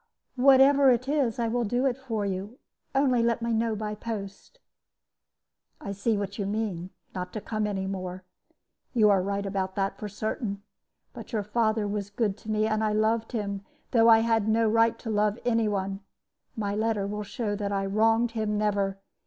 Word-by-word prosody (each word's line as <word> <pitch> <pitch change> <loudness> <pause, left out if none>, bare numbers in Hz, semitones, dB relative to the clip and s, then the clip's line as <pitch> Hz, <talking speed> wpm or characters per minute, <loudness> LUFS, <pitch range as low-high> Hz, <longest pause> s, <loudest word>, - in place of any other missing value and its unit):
"Whatever 270 +1 +6
it 250 +1 +2
is, 275 -6 +1
I 235 -1 0
will 240 +1 0
do 245 +4 0
it 260 -3 +2
for 230 -6 -3
you; 200 +5 -4 0.4
only 265 -3 +3
let 235 0 +1
me 235 0 0
know 225 0 +1
by 210 0 -3
post." 210 - -7 1.2
"I 200 - -6
see 205 +2 0
what 200 +1 -4
you 200 - -1
mean 200 -4 -2 0.2
not 180 0 -5
to 215 - -3
come 215 0 -2
any 195 -2 -2
more. 185 -1 -5 0.7
You 215 -3 +5
are 195 -2 +4
right 200 +1 -2
about 190 -1 -2
that, 195 -1 -1
for 210 - -5
certain. 205 0 -4 0.5
But - - -10
your 215 -2 0
father 215 0 +1
was 205 -1 -3
good 205 -1 -1
to 220 - -11
me, 215 0 +1
and 215 0 0
I 215 -1 +1
loved 220 +2 +1
him, 200 -3 -3 0.3
though 230 -1 +5
I 225 0 +7
had 225 -2 +1
no 225 +1 +3
right 225 +1 +3
to 225 - -5
love 210 0 +1
any 230 -2 +2
one. 195 -1 -2 0.6
My 205 -2 -2
letter 215 -1 0
will 210 +1 -3
show 205 +1 -3
that 205 -1 -3
I 195 -1 0
wronged 225 +4 +2
him 215 -2 -1
never. 200 -2 0
215 Hz, 190 wpm, -27 LUFS, 200-230 Hz, 1.2 s, I